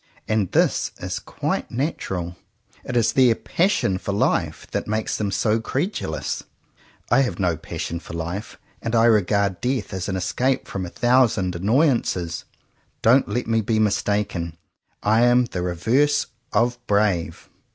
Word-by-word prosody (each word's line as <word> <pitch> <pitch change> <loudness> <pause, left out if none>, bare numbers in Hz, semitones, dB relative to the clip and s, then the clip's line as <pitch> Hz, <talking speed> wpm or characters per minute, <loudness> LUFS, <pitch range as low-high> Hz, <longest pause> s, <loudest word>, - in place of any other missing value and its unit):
And 110 -4 0
this - - +2
is - - -4
quite - - -3
natural. 95 - -3 0.5
It 125 - -2
is 115 - +3
their 125 -4 +5
passion 165 - +1
for 100 - -3
life 100 - 0
that - - -2
makes 110 +1 -1
them 105 -2 -1
so 105 +3 +1
credulous. 130 - -2 0.7
I - - +6
have 130 - -1
no 90 -4 +1
passion 85 +2 -5
for 85 - -11
life, 85 +6 -5 0.2
and 115 0 -2
I 115 0 +5
regard 100 -4 +2
death 125 -6 -1
as 95 +1 -3
an 95 - -1
escape 125 +8 0
from 95 -2 -4
a - - -7
thousand 115 -6 +2
annoyances. 105 - +1 0.6
Don't 130 +4 +5
let 125 - -1
me 115 0 +1
be 110 +1 0
mistaken. 100 -5 0 0.5
I 110 +2 +3
am 120 +1 +5
the 90 -6 -4
re 90 0 -2
verse 140 - +2 0.3
of 120 +3 +1
brave. 100 -5 0
110 Hz, 150 wpm, -23 LUFS, 95-120 Hz, 0.7 s, I